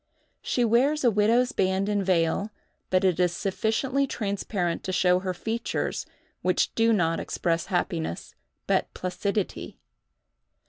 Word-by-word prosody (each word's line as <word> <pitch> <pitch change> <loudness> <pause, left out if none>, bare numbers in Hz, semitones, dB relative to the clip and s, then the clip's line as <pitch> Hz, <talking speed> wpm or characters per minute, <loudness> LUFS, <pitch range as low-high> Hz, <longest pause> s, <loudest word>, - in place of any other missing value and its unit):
She 245 - +1
wears 270 +7 +2
a 240 - +5
widow's 225 +4 +3
band 190 +1 +1
and 205 -1 0
veil, 180 +2 +1 0.4
but 185 +1 +2
it 185 -2 +2
is 180 -1 +2
sufficiently 225 +9 0
transparent 200 -6 -2
to 185 - -2
show 180 0 +3
her 185 0 -2
features, 225 +5 -3 0.3
which - - +1
do 230 0 +3
not 165 -6 +2
express 165 -2 -1
happiness, 175 - -2 0.3
but - - +1
placidity. 200 +2 -3
195 Hz, 130 wpm, -26 LUFS, 180-225 Hz, 0.4 s, a